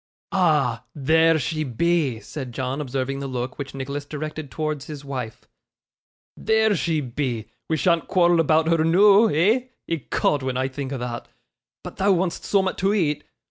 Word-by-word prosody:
'Ah! 155 - +2
there 160 +3 +4
she 155 +2 -2
be,' 145 -1 0
said 130 0 -7
John, 130 +3 -3
observing 135 0 -3
the 140 - -4
look 130 +1 -4
which 140 -1 -6
Nicholas 140 +2 -4
directed 155 0 -6
towards 155 -2 -3
his 145 -2 -8
wife. 125 -5 -6 0.9
'There 220 -1 +2
she 165 -2 0
be 120 -4 -3 0.2
we 160 - +1
shan't 170 +1 +2
quarrel 175 -2 +3
about 160 0 +3
her 165 -1 +3
noo 200 +6 +6
eh? 215 - +2 0.2
Ecod, 150 -2 0
when 130 -1 -2
I 130 +1 0
think 135 0 -5
o' 135 - -2
thot 120 -1 -5 0.6
but - - -9
thou 195 +1 +3
want'st 180 -1 -1
soom'at 190 -2 +1
to 195 +3 +2
eat. 150 -7 0
150 Hz, 165 wpm, -23 LUFS, 130-170 Hz, 0.9 s, noo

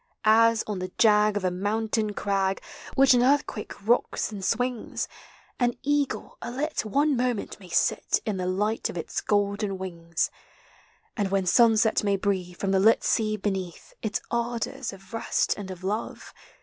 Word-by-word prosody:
As, 225 +1 +5
on 210 -3 -3
the 185 0 -5
jag 210 -1 +4
of 195 - -2
a 180 - +2
mountain 215 +2 -1
crag 195 -1 0 0.4
Which 270 -1 +6
an 245 - +4
earthquake 250 -6 0
rocks 235 -1 +1
and 200 -2 -7
swings, 245 +3 -1 0.5
An 245 -1 +1
eagle, 290 -1 -1
a - - -5
lit, 290 +6 -2
one 285 +7 +2
moment 245 -5 -2
may 185 -3 -13
sit - - +1
In 210 -3 -1
the 180 -1 -2
light 210 +4 0
of - - -6
its 165 - -3
golden 200 -1 0
wings; 170 -3 -3 0.8
And 205 -4 0
Avhen 195 -1 0
sunset 220 +1 +4
may 200 -1 +2
breathe, 185 -3 -2
from 195 - -1
the 190 - +3
lit 220 +4 +4
sea 215 -1 +1
beneath. 190 -4 -4
Its 215 -2 -2
ardors 235 +2 -2
of 195 0 -14
rest 225 - 0
and 200 -2 -7
of 185 -1 -8
love. 205 +4 -4
210 Hz, 165 wpm, -26 LUFS, 190-230 Hz, 0.8 s, Which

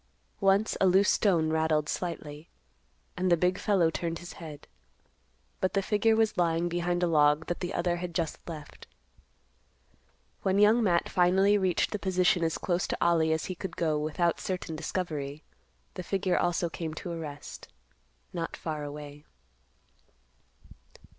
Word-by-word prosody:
Once 195 +2 +3
a 195 - +5
loose 190 +2 +5
stone 165 -6 +2
rattled 160 -1 +1
slightly, 155 -3 -5 0.7
and 185 0 0
the 170 - +5
big 180 +3 +1
fellow 185 -6 +2
turned 165 +1 -3
his 175 +1 -9
head; 150 -3 -9 0.9
but 185 - 0
the 195 - +3
figure 215 +2 +2
was 220 -4 +1
lying 170 0 +2
behind 175 +1 -1
a - - +5
log 150 -1 +3
that 175 - -3
the 180 0 -3
other 175 -2 0
had 175 -1 -6
just 165 -3 -2
left. 150 -3 -9 1.5
When 190 0 +1
Young 210 +3 +5
Matt 175 -6 +2
finally 190 +3 +3
reached 190 -4 +1
the 210 - -3
position 180 -2 +2
as 160 -1 0
close 175 -1 -1
to - - -2
Ollie 165 -2 +3
as 160 0 0
he 185 - -4
could 180 -1 -7
go 155 -3 +1
without 160 +3 0
certain 180 -3 -4
discovery, 155 -3 -4 0.5
the 185 - -5
figure 190 +1 0
also 175 0 +1
came 160 -1 -5
to 175 - -6
a 165 - -5
rest, 145 -2 -8 0.7
not 165 -2 -4
far 155 -2 -4
away. 145 0 -8
175 Hz, 155 wpm, -29 LUFS, 160-185 Hz, 1.5 s, a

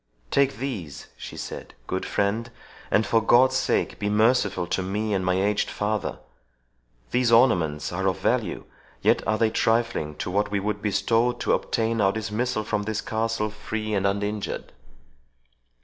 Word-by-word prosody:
"Take 140 -1 +3
these," 110 - -5
she - - -9
said, - - -7
"good - - -3
friend, 110 +4 0 0.4
and 110 - +3
for 115 - +3
God's 130 +4 +5
sake - - 0
be 105 - -1
merciful 105 -4 +2
to 95 - -1
me 105 +3 -2
and 95 -2 0
my 90 0 +1
aged 100 +1 +1
father! 105 0 -2 0.9
These 125 -1 +2
ornaments 85 - +3
are 95 +2 -1
of 95 - +1
value, - - -1 0.4
yet - - +4
are 110 +2 +2
they 110 -1 +2
trifling 115 -12 +1
to 90 - -4
what 105 +2 0
he 100 - +1
would 105 +1 -2
bestow 115 +4 +2
to 120 - 0
obtain 115 -1 0
our 95 -1 +4
dismissal 110 +2 -2
from 105 0 -1
this 110 0 -2
castle, 110 -1 -1
free 110 0 -4
and 100 -1 +2
uninjured." 105 +1 -3
105 Hz, 160 wpm, -25 LUFS, 100-115 Hz, 0.9 s, God's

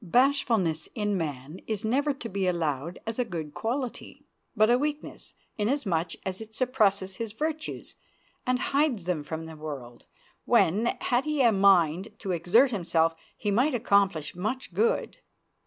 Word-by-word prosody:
Bashfulness 225 - +2
in 210 -3 0
man 150 -1 -4
is 220 -1 -2
never 280 +6 +2
to 265 -4 -6
be 195 -3 -1
allowed 165 -2 -1
as 225 +2 -4
a - - +4
good 165 -9 -6
quality, 245 +2 -4 0.3
but 215 +1 +4
a 245 - +5
weakness, 295 +1 -4 0.2
inasmuch 200 - 0
as 190 +2 -3
it 220 0 -10
suppresses 200 -7 +1
his 225 -2 -4
virtues 310 +5 -4 0.5
and 255 0 +1 0.2
hides 280 - +2
them 175 -3 -1
from 160 +2 -5
the 160 0 -9
world, 140 -6 -8 0.4
when, 205 +8 +3
had 250 +2 +1
he 300 -3 +1
a 235 - +6
mind 190 -2 +3
to 195 - -4
exert 180 - +4
himself, 165 -5 +1 0.2
he 210 - -1
might 250 +7 +2
accomplish 195 -9 +2
much 215 +3 -3
good. 215 - +1
200 Hz, 155 wpm, -27 LUFS, 170-245 Hz, 0.5 s, a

